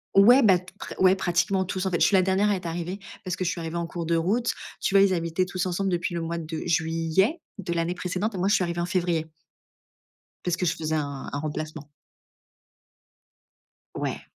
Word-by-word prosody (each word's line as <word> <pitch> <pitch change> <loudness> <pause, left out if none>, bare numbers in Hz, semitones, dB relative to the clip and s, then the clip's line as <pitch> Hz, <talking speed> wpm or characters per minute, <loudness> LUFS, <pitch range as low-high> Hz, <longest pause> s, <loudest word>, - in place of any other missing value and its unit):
ouais 240 +7 +8
bah, 190 -5 +6
t 185 +1 -13
pre - - -6
ouais, 185 0 +6
pratiquement 185 +1 +1
tous. 190 0 -3
En 190 - 0
fait, 170 - 0
je - - +5
suis 200 - +3
la 185 - +6
dernière 190 +2 +2
à 205 - +3
être 180 -2 -7
arrivée 170 +3 -3 0.3
parce 180 - -2
que 185 - -3
je 170 - +1
suis 170 - -5
arrivée 165 0 -5
en 170 0 -2
cours 170 -1 -5
de 170 - +1
route. 205 +9 +1 0.3
Tu 195 - -1
vois, 195 - +8
ils 195 -1 +3
habitaient 170 +1 0
tous 185 0 -2
ensemble 190 +2 -1
depuis 175 0 -1
le 170 - -2
mois 170 +1 -3
de 160 -1 -5
juillet 165 - +1 0.2
de 180 -4 -3
l'année 170 +1 0
précédente 185 +5 -2
et - - -3
moi, 185 - +1
je 205 - +4
suis 190 - +2
arrivée 170 0 -2
en - - 0
février. 175 -3 0 1.2
Parce 180 -1 0
que 180 +1 -1
je 165 - +2
faisais 160 -1 -2
un 140 -3 -4
un 145 - -2
remplacement. 155 0 -5 2.1
Ouais. - - -4
175 Hz, 225 wpm, -26 LUFS, 165-190 Hz, 2.1 s, ouais